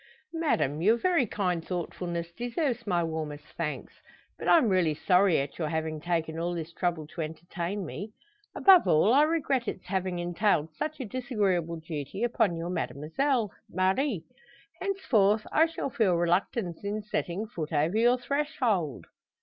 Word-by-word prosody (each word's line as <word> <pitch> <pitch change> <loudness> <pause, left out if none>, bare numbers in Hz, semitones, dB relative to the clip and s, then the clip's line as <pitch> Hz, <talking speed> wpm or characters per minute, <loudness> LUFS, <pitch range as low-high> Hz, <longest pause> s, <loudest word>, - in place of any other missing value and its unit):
"Madame, 275 - 0
your 220 +6 +4
very 335 -3 +2
kind 180 -5 -1
thoughtfulness 170 -1 -4
deserves 240 - -2
my 175 -3 +2
warmest 155 -2 -4
thanks. 160 -3 -5 0.4
But - - -5
I'm 320 -8 +6
really 180 -6 +2
sorry 180 +2 +4
at 140 +4 -3
your 155 -3 -1
having 160 -1 -2
taken 165 -1 -1
all 175 +1 -1
this 165 0 -5
trouble 170 -4 -1
to 165 +3 -7
entertain 175 +4 -4
me. 200 +6 -6 0.4
Above 380 -3 +7
all, 185 +9 +4
I 280 - +6
regret 285 -6 +1
its 185 - -5
having 185 -1 -2
entailed 175 -2 0
such 310 +1 -4
a 260 - -3
disagreeable 200 - -1
duty 160 - -5
upon 225 -6 +2
your 165 +1 -4
Mademoiselle 185 - -1 0.2
Marie. 190 - 0 0.6
Henceforth 225 - +2
I 320 +1 +5
shall 325 -4 -4
feel 200 -7 +2
reluctance 175 +2 0
in 205 +1 -3
setting 200 -1 -2
foot 170 -8 -6
over 155 +5 +1
your 240 +3 +4
threshold." 250 - -1
185 Hz, 150 wpm, -28 LUFS, 165-235 Hz, 0.6 s, Above